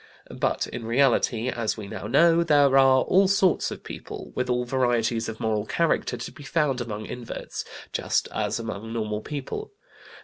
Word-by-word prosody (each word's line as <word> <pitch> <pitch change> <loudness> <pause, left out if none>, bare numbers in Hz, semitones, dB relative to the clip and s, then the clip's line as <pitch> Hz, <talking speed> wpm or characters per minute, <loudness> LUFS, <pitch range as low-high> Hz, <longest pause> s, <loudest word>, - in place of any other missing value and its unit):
But, - - 0
in 120 - -7
reality, 120 -1 +2
as 115 -3 -2
we 105 -2 -7
now 100 - -6
know, 165 +7 +5
there 145 -4 +4
are 135 -1 +6
all 190 +1 +4
sorts 195 -2 +2
of - - -8
people, - - -8
with 125 0 -2
all 125 0 +1
varieties 120 -3 +1
of 110 - -7
moral 110 -1 -1
character, 170 -1 0
to - - -6
be - - -14
found 140 -2 0
among 110 -2 -5
inverts, 125 -2 -6 0.3
just - - 0
as - - -1
among 115 0 -5
normal 105 -2 -2
people. 150 - -6
125 Hz, 170 wpm, -25 LUFS, 115-145 Hz, 0.3 s, are